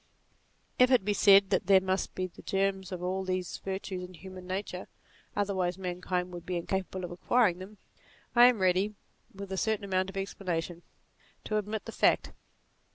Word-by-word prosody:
If 250 0 +7
it 250 -7 +4
be 205 - +2
said, 200 -1 +6
that 190 - +1
there 195 -1 +7
must 190 +1 -2
be 185 - -1
the 185 - -11
germs 195 -1 -1
of 180 -1 -5
all 190 +1 -1
these 185 -2 -3
virtues 190 -1 -4
in 180 0 -9
human 185 +2 -10
nature, 185 -1 -4 0.5
otherwise 190 -3 0
mankind 180 -1 -3
would 175 -1 -7
be 180 -1 -3
incapable 185 +1 -3
of 175 - -8
acquiring 180 +1 +2
them, 200 +3 -10 0.6
I 240 0 +9
am 250 -2 +3
ready, 190 +3 +2 0.4
with 200 0 -9
a 190 - -2
certain 215 0 0
amount 190 -1 0
of 195 - -8
explanation, 175 -3 -3 0.6
to 215 - -1
admit 210 +1 -4
the - - -6
fact. - - +2
190 Hz, 175 wpm, -30 LUFS, 180-200 Hz, 0.6 s, I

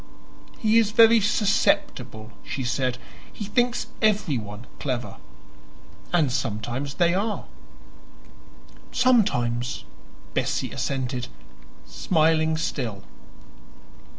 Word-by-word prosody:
"He 220 +1 +4
is 220 -3 +2
very 230 0 +6
susceptible," 195 - +1
she 135 - -4
said. 125 0 -1 0.3
"He 210 - -6
thinks 240 +4 +1 0.2
everyone 135 - 0
clever, 125 -3 -3 0.9
and 160 -7 +3
sometimes 120 +3 -3
they 170 -1 +3
are." 210 +3 -1 1.5
"Sometimes," 125 - +2 0.5
Bessie - - -1
assented, 130 -2 -2 0.6
smiling 160 -1 +2
still. 115 -11 -3
155 Hz, 80 wpm, -25 LUFS, -, 1.5 s, very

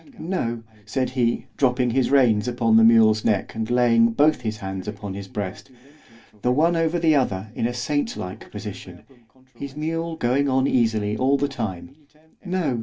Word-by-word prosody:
No! 120 -10 -3 0.2
said 130 +5 -2
he, 120 -2 0
dropping 125 -2 +2
his 130 +1 +1
reins 120 -6 +3
upon 120 -2 +1
his 115 0 +7
mule's 110 -2 +5
neck, 100 -3 0
and 110 0 -4
laying 115 -2 +3
both 150 +2 +3
his 110 -2 -3
hands 95 -1 -6
upon 105 -2 -6
his 100 0 -7
breast, 100 +4 -6 0.7
the 125 - +1
one 165 +6 +2
over 165 +1 +1
the 165 -2 +3
other 110 -8 0
in 115 - -1
a 120 - -4
saint 145 - -2
like 90 +1 -7
position 100 -4 -9 0.5
(his 135 +3 -8
mule 165 +2 -3
going 140 0 +1
on 130 0 +2
easily 110 -5 +1
all 135 +4 +2
the 145 - 0
time) 120 -2 -6 0.5
No! 180 -10 -1
120 Hz, 175 wpm, -23 LUFS, 110-140 Hz, 0.7 s, his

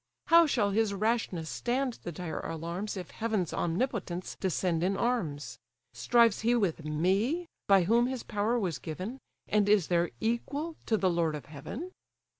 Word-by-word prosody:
How 335 0 +8
shall 210 -8 +1
his 210 -1 +1
rashness 210 -6 0
stand 250 - -1
the 175 - -5
dire 170 0 -5
alarms, 170 +6 -4
If 180 -6 -7
heaven's 215 -5 -1
omnipotence 180 -1 -2
descend 180 -2 0
in 195 +2 +1
arms? 170 -13 -1 0.3
Strives 235 -3 +4
he 235 +2 +3
with 185 -8 0
me, 195 - +1 0.2
by 195 -2 +6
whom 235 +6 +3
his 260 -2 -4
power 210 +4 0
was 180 - -1
given, 185 - -6 0.3
And 205 -1 +2
is 205 -6 +4
there 175 -1 +2
equal 280 +8 -2
to 220 - +3
the 190 -3 +2
lord 165 -2 +1
of 150 - -7
heaven?" 225 - -7
200 Hz, 160 wpm, -30 LUFS, 170-235 Hz, 0.3 s, How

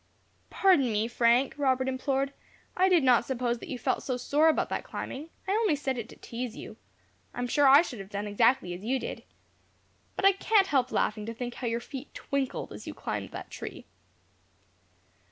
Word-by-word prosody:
"Pardon 325 -11 +3
me, 215 +1 +1
Frank," 240 +2 +3
Robert 260 -2 +2
implored, 270 +1 -1 0.4
"I 375 +1 +4
did 350 -5 +4
not 250 -3 +5
suppose 240 -1 -1
that - - -10
you 255 - -3
felt 240 - -1
so 255 -2 -2
sore 295 +5 +3
about 315 - +1
that - - -2
climbing. 295 +5 -6 0.2
I - - 0
only 420 -6 +2
said 275 -2 -2
it 235 -2 -6
to - - -12
teaze 240 -1 -6
you. - - -9 0.6
I - - -5
am 245 - 0
sure 285 +3 +3
I 280 +4 +8
should 250 -10 -7
have 195 0 -8
done 205 0 -4
exactly 210 -2 +2
as 180 +3 -8
you 255 +5 0
did. - - -6 0.9
But - - -1
I 390 - +8
can't 395 +1 +3
help 265 -8 +1
laughing 210 0 0
to 230 - -5
think 245 +1 -5
how 245 - -5
your 230 0 0
feet 270 +3 -9
twinkled, 275 -2 -3
as 105 - -10
you - - -6
climbed - - -4
that - - -8
tree." - - -8
255 Hz, 200 wpm, -28 LUFS, 235-285 Hz, 0.9 s, I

